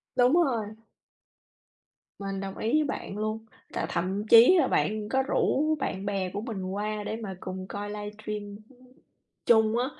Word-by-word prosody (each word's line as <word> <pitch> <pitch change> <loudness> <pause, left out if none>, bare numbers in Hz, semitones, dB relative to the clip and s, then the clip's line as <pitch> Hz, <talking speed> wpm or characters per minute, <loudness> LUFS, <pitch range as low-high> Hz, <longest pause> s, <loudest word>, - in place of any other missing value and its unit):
Đúng 250 +2 +4
rồi. 260 -11 +2 1.5
Mình 195 -1 -4
đồng 195 0 -6
ý 225 - -1
với 310 - +4
bạn 275 -7 -5
luôn, 215 +1 -3 0.3
là - - -1
thậm 190 +4 -2
chí 235 +11 +8
là 270 - +3
bạn 210 0 0
có 265 0 +2
rủ 310 +3 +1
bạn 195 -5 -3
bè 195 -2 -1
của 205 - -5
mình 220 -5 -5
qua 210 +2 -3
để 215 - -3
mà 200 -5 -6
cùng 185 0 -6
coi 205 0 -5
livestream, 210 0 -6 0.9
chung 220 -1 +4
á 245 - +1
210 Hz, 160 wpm, -27 LUFS, 200-235 Hz, 1.5 s, chí